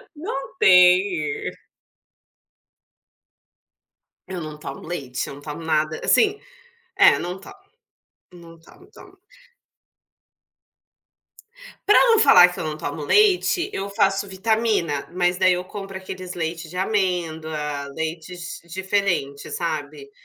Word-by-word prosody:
Não 295 -3 -6
tem. 180 -4 +4 2.8
Eu 185 -2 -6
não 155 -1 -7
tomo 135 -2 -8
leite, 135 -7 -4
eu 140 - -8
não 145 - -13
tomo 150 +2 -8
nada 155 -1 0
assim, 420 -1 +3 0.6
é - - +6
não 180 +2 -5
tomo, 390 - -12 0.8
não 165 -1 -14
tomo 370 - -19
tomo. - - -16 2.7
Para 420 - +7
não 450 - +5
falar 180 - +8
que - - -8
eu - - -3
não 155 -1 -4
tomo 150 0 -5
leite, 390 - +3
eu 195 +1 -4
faço 200 -1 +1
vitamina, 195 -6 -1
mas, 180 0 0
daí, 185 -1 +4
eu 180 0 -3
compro 195 -1 -8
aqueles 185 -1 -8
leite 165 0 -4
de 180 - -8
amêndoa, 160 -7 -2
leites 165 +2 -6
diferente, 180 -6 -2
sabe. 150 -4 -5
175 Hz, 115 wpm, -22 LUFS, 155-195 Hz, 2.8 s, falar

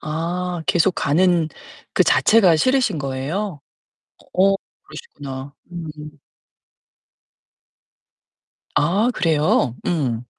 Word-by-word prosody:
아, 170 +2 -3
계속 175 +2 +3
가는 170 +2 +2 0.4
그 - - +3
자체가 195 -7 +5
싫으신 250 - +2
거예요? 145 +7 -3 0.7
어, 195 +2 +4 0.3
그러시구나. 140 - -9 0.2
음음. 155 -3 -8 2.6
아 195 +10 +2
그래요? 155 - +2
음. 125 -9 -1
165 Hz, 160 characters per minute, -21 LUFS, 145-185 Hz, 2.6 s, 자체가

